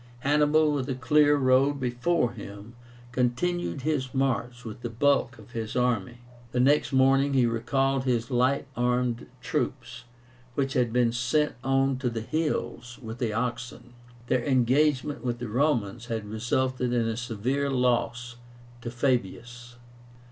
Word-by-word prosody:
Hannibal, 150 +2 +3
with 140 -2 -2
a 130 - -1
clear 145 +3 +4
road 135 +1 +3
before 125 +2 0
him, 105 0 -10 0.4
continued 130 +5 -1
his 135 -4 -1
march 125 -2 -1
with 110 +1 -8
the 120 - -4
bulk 130 +2 +1
of - - -15
his 110 -2 -5
army. 120 -2 0 0.3
The 125 - 0
next 145 +4 +3
morning 135 +1 +3
he 130 -2 +4
recalled 135 +3 0
his 120 0 0
light 130 +3 +2
armed 125 -1 0
troops, 125 -5 -3 0.5
which 135 -1 -1
had 120 -2 +1
been 120 -1 +2
sent 125 +6 +1
on 135 0 +2
to 130 -2 0
the 115 -1 -4
hills 120 -3 -3
with 115 -1 -8
the 120 -3 -1
oxen. 120 +1 -4 0.3
Their 125 0 0
engagement 135 +2 +1
with 120 -1 -2
the 120 -2 -6
Romans 120 -3 0
had 110 -3 -3
resulted 125 +4 -1
in 120 -2 +1
a 115 - -1
severe 125 +4 -2
loss 120 -2 0 0.4
to 120 - -5
Fabius. 120 0 -2
125 Hz, 145 wpm, -27 LUFS, 120-135 Hz, 0.5 s, clear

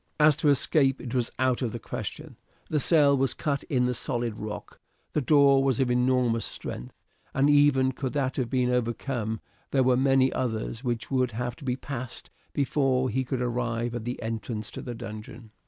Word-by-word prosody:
As 150 -1 +6
to 155 -2 +2
escape 140 -1 +3
it 120 - -6
was 125 -2 0
out 130 0 +1
of 120 -4 -1
the - - -3
question. - - -6 0.4
The 155 - +2
cell 145 -2 +5
was 135 -2 +1
cut 145 -3 -1
in 125 -3 +1
the 125 - +1
solid 120 -2 -2
rock. 105 0 -7 0.3
The 150 - +1
door 140 -1 +5
was 135 -4 +1
of 130 -2 +2
enormous 125 -2 +2
strength, - - -6 0.4
and 140 +2 +4
even 145 -2 +4
could 130 0 -4
that 135 -3 -1
have 125 -4 -1
been 125 -2 +1
overcome, 120 -2 -2 0.3
there 135 -1 +3
were 125 0 +4
many 135 0 +3
others 115 0 -3
which 120 -1 -3
would 130 -3 +1
have 120 +2 -3
to - - -11
be 125 -2 0
passed 130 -2 -6 0.2
before 135 -2 +1
he 130 +4 0
could 125 -1 -2
arrive 120 -1 -1
at 120 -2 -4
the 120 +1 -3
entrance 110 -1 -4
to - - -7
the 120 - -6
dungeon. 110 0 -9
125 Hz, 190 wpm, -27 LUFS, 120-135 Hz, 0.4 s, As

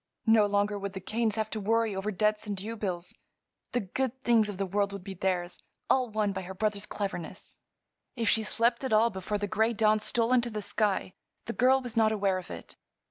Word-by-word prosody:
No 220 -2 +5
longer 205 0 +1
would 200 0 -5
the 190 - -5
Kanes 220 +3 0
have 220 -1 -2
to 220 - -2
worry 225 0 +1
over 195 +2 -2
debts 210 +2 0
and 205 -1 -3
duebills; 190 -4 -4 0.6
the 245 - 0
good 260 +6 -2
things 225 -3 +4
of 200 - -5
the 195 - -1
world 200 +1 0
would 200 -2 -7
be 195 0 -6
theirs, 180 -1 -2 0.3
all 255 -2 +3
won 210 -2 0
by 190 - -3
her 190 +1 -8
brother's 210 0 -1
cleverness. 195 -5 -6 0.6
If 230 -2 -1
she 225 - +4
slept 235 +3 +1
at 260 - -1
all 225 +2 +5
before 190 +2 -3
the 205 - -2
gray 220 +3 +1
dawn 215 -1 +3
stole 230 +3 +1
into 240 -1 +3
the 215 -2 -4
sky 200 -4 0 0.3
the 230 - -4
girl 260 +2 +4
was 245 -2 -5
not 220 -1 +4
aware 195 -3 +1
of 185 - -11
it. 85 -1 -9
210 Hz, 215 wpm, -29 LUFS, 195-225 Hz, 0.6 s, No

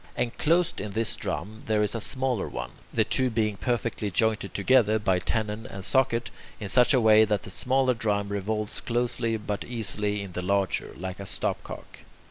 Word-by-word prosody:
Enclosed 165 - +1
in 105 0 -5
this 115 +1 0
drum 100 +9 -5
there 105 -1 +2
is 105 - 0
a 115 - -3
smaller 130 -2 -1
one, - - -5 0.2
the 110 - +3
two 125 +4 +1
being 110 -2 0
perfectly 115 -1 -2
jointed 105 +1 +1
together 110 0 +3
by 95 -4 +1
tenon 110 +2 -2
and 95 -1 -8
socket, 125 -3 +1 0.3
in 105 - -5
such 125 +5 +5
a - - +4
way 110 -1 +6
that 105 -2 0
the - - -7
smaller 130 +4 +2
drum 105 -3 -1
revolves 105 +1 -1
closely 120 -1 0
but 105 -1 -4
easily 105 -3 -1
in 100 - -8
the 90 - -4
larger, 100 +1 0
like 95 +2 -6
a 100 - -6
stopcock. - - -4
110 Hz, 180 wpm, -27 LUFS, 100-120 Hz, 0.3 s, way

